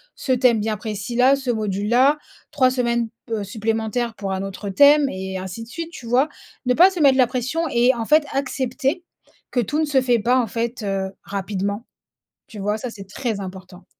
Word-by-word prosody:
ce 265 Hz, -, -3 dB
thème 250 Hz, -3 st, +3 dB
bien 215 Hz, 0 st, -1 dB
précis 210 Hz, +1 st, -5 dB
là, 255 Hz, +3 st, +5 dB
ce 270 Hz, -2 st, -5 dB
module 210 Hz, -3 st, -1 dB
là, 265 Hz, +5 st, +4 dB, 0.3 s
3 270 Hz, -4 st, +3 dB
semaines, 235 Hz, -2 st, 0 dB, 0.2 s
p 230 Hz, -, -6 dB
heu, 215 Hz, -2 st, -1 dB
supplémentaires 220 Hz, +3 st, -2 dB
pour 195 Hz, -3 st, -4 dB
un 190 Hz, 0 st, -3 dB
autre 195 Hz, +1 st, -6 dB
thème» 285 Hz, +7 st, +6 dB
et 190 Hz, 0 st, -5 dB
ainsi 190 Hz, +4 st, -6 dB
de -, -, -12 dB
suite, 330 Hz, +6 st, -6 dB
tu 265 Hz, -, -10 dB
vois? 250 Hz, +6 st, +2 dB, 0.4 s
Ne 250 Hz, -, +3 dB
pas 360 Hz, +6 st, +7 dB
se 370 Hz, -, -5 dB
mettre 275 Hz, -3 st, +5 dB
la 255 Hz, -, +6 dB
pression 255 Hz, +7 st, -2 dB
et 240 Hz, +2 st, +4 dB
en 230 Hz, -1 st, -3 dB
fait 305 Hz, +5 st, +4 dB
accepter 270 Hz, +4 st, -1 dB, 0.5 s
que 250 Hz, -, -1 dB
tout 270 Hz, +7 st, 0 dB
ne 315 Hz, -, +2 dB
se 290 Hz, -3 st, +2 dB
fait 245 Hz, -2 st, +2 dB
pas 245 Hz, +4 st, +2 dB
en 245 Hz, -, +1 dB
fait, 230 Hz, +2 st, -3 dB
heu, 195 Hz, -1 st, -2 dB
rapidement. 200 Hz, +2 st, -3 dB, 0.6 s
Tu 220 Hz, -, -11 dB
vois, 205 Hz, +2 st, -1 dB
ça 240 Hz, +3 st, -5 dB
c'est 195 Hz, -4 st, -11 dB
très 220 Hz, 0 st, -3 dB
important. 185 Hz, -1 st, -9 dB
235 Hz, 210 wpm, -22 LUFS, 205-260 Hz, 0.6 s, pas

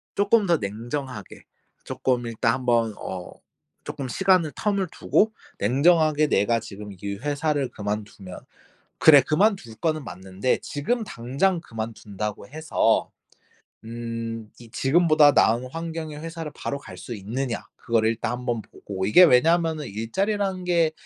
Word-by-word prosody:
쪼끔 205 Hz, +1 st, +3 dB
더 170 Hz, -3 st, +3 dB
냉정하게 115 Hz, +2 st, -6 dB, 0.4 s
쪼끔 125 Hz, -2 st, -1 dB
일단 115 Hz, 0 st, 0 dB
한번 120 Hz, -3 st, +1 dB
어 90 Hz, -1 st, -7 dB, 0.5 s
조금 135 Hz, -, -5 dB
시간을 180 Hz, +2 st, +2 dB
텀을 200 Hz, -4 st, -1 dB
두고 220 Hz, +1 st, +1 dB, 0.3 s
냉정하게 155 Hz, -, +3 dB
내가 115 Hz, 0 st, +2 dB
지금 105 Hz, -1 st, -9 dB
이 100 Hz, 0 st, -3 dB
회사를 145 Hz, +1 st, -1 dB
그만두면 105 Hz, -2 st, -6 dB, 0.6 s
'그래. 145 Hz, -3 st, +8 dB
그만둘 155 Hz, -, +1 dB
거는 155 Hz, +4 st, -1 dB
맞는데 95 Hz, +1 st, -2 dB
지금 225 Hz, +12 st, -2 dB
당장 140 Hz, -, -1 dB
그만둔다고 105 Hz, -, -6 dB
해서 155 Hz, +3 st, +1 dB, 0.8 s
음 115 Hz, -1 st, -6 dB
이 115 Hz, -, -13 dB
지금보다 155 Hz, +3 st, +4 dB
나은 120 Hz, -1 st, +3 dB
환경의 165 Hz, -2 st, -5 dB
회사를 165 Hz, -1 st, -6 dB
바로 140 Hz, -, -4 dB
갈 -, -, -11 dB
수 120 Hz, -, -7 dB
있느냐.' 115 Hz, +5 st, -4 dB
그거를 115 Hz, -1 st, +1 dB
일단 115 Hz, 0 st, -2 dB
한번 120 Hz, -2 st, -2 dB
보고. 95 Hz, -2 st, -6 dB
이게 110 Hz, -, +7 dB
왜냐면은 160 Hz, +2 st, +3 dB
일자리라는 190 Hz, -, -2 dB
게 170 Hz, -3 st, +2 dB
130 Hz, 290 characters per minute, -24 LUFS, 115-165 Hz, 0.8 s, 그래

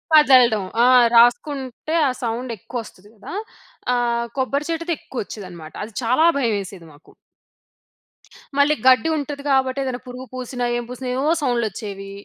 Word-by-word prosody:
వదలడం. 250 Hz, -8 st, +6 dB, 0.2 s
ఆ! -, -, +6 dB, 0.3 s
రాసుకుంటే, 265 Hz, +3 st, +2 dB
ఆ -, -, +2 dB
సౌండ్ 235 Hz, +1 st, -3 dB
ఎక్కువ 245 Hz, +6 st, -7 dB
వస్తది 205 Hz, -1 st, -16 dB
గదా! 210 Hz, -, -10 dB, 0.6 s
ఆహ్, 235 Hz, -1 st, 0 dB
కొబ్బరి 275 Hz, +3 st, -1 dB
చెట్టుది 335 Hz, +1 st, -1 dB
ఎక్కువ 260 Hz, -, -6 dB
వచ్చేదనమాట. 180 Hz, -6 st, -10 dB
అది 215 Hz, 0 st, -9 dB
చాలా 255 Hz, +8 st, +3 dB
భయమేసేది 200 Hz, -8 st, -2 dB
మాకు. 145 Hz, -, -20 dB, 1.5 s
మళ్ళి 285 Hz, +2 st, +4 dB
గడ్డి 260 Hz, +5 st, +5 dB
ఉంటది. 285 Hz, -1 st, -5 dB
గాబట్టి 265 Hz, 0 st, +2 dB
ఏదైనా 255 Hz, -1 st, -4 dB
పురుగు 250 Hz, +1 st, -8 dB
పూసిన, 255 Hz, 0 st, -6 dB, 0.2 s
ఏం 240 Hz, -, -3 dB
పూసిన, 250 Hz, +1 st, -6 dB
ఏవోవో 295 Hz, +5 st, +2 dB
సౌండ్‌లు 245 Hz, -4 st, +1 dB
వచ్చేవి. 195 Hz, -1 st, -8 dB
250 Hz, 140 wpm, -21 LUFS, 220-275 Hz, 1.5 s, వదలడం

